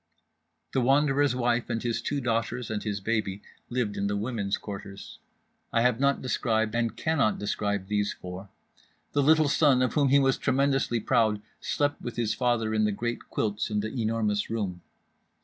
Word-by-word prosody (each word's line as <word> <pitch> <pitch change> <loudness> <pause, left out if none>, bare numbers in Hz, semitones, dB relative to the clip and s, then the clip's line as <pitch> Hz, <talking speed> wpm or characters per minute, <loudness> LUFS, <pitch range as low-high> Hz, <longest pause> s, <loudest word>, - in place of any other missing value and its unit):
The 130 - +2
Wanderer's 140 +1 +3
wife 120 -1 0
and 115 - -2
his 115 -1 -1
two 140 +3 -2
daughters 115 0 -1
and 105 -1 -2
his 105 -2 -3
baby 100 -2 -2 0.3
lived 120 -4 -1
in 100 - 0
the 100 0 -1
women's 105 -2 -1
quarters. 100 -1 -8 0.5
I 115 - +2
have 125 -1 +2
not 140 0 +2
described 110 -4 0
and 115 -1 -1
cannot 145 -9 +1
describe 100 -1 -2
these 105 +1 0
four. 90 +2 -8 0.6
The 145 - +2
little 155 +2 +5
son 140 -3 +4
of 125 - 0
whom 145 -3 +3
he 140 - +6
was 135 -1 +3
tremendously 135 -3 +1
proud 110 -1 +2 0.2
slept 145 0 -1
with 120 - -5
his 115 -2 0
father 120 -3 0
in 110 -1 +2
the 105 - +1
great 120 +4 -4
quilts 105 0 -1
in 105 -1 0
The 110 - -3
Enormous 110 -4 0
Room. 100 -6 -3
115 Hz, 175 wpm, -27 LUFS, 105-130 Hz, 0.6 s, he